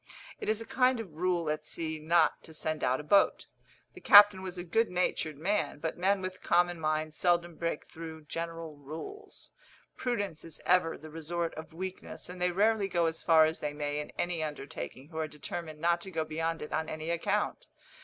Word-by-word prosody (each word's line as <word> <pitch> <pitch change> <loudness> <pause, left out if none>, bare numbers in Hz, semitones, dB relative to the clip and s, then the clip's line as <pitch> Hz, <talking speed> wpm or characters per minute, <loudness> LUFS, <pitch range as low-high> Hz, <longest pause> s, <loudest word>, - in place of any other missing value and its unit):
It - - -3
is 215 0 +1
a 225 - -6
kind 255 +1 +2
of 195 -8 -7
rule 175 0 0
at 150 0 -1
sea 160 0 -3
not 160 +1 +3
to 160 - -11
send 155 -1 -2
out 130 +1 +2
a - - -6
boat. 200 +6 +4 0.5
The - - -12
captain 205 -2 +9
was 185 -1 -5
a 175 - -4
good 225 +6 +1
natured 175 -4 -1
man; 200 +4 0
but 160 +2 -3
men 190 +2 +1
with 185 0 -5
common 175 0 +2
minds 155 0 -1
seldom 175 0 +2
break 165 -2 -3
through 160 -1 -9
general 165 0 -5
rules. 160 - -9 0.5
Prudence 205 -10 -2
is 165 - -9
ever 180 -2 +3
the 155 0 -11
resort 165 +2 -3
of 160 +1 -9
weakness, 185 +2 -6
and 180 0 -8
they 180 - +3
rarely 205 +3 +2
go 175 -3 +1
as 160 0 -1
far 160 -2 +6
as 160 +1 -1
they 150 -1 -3
may 145 0 -2
in 150 - -5
any 175 -2 -1
undertaking 145 -2 -6
who 160 -2 -6
are 160 - 0
determined 155 +1 -6
not 170 +1 +2
to 190 - -7
go 160 -3 -2
beyond 165 +1 -2
it 150 - -7
on 160 0 -1
any 155 +1 -3
account. 170 - -1
165 Hz, 205 wpm, -31 LUFS, 155-180 Hz, 0.5 s, captain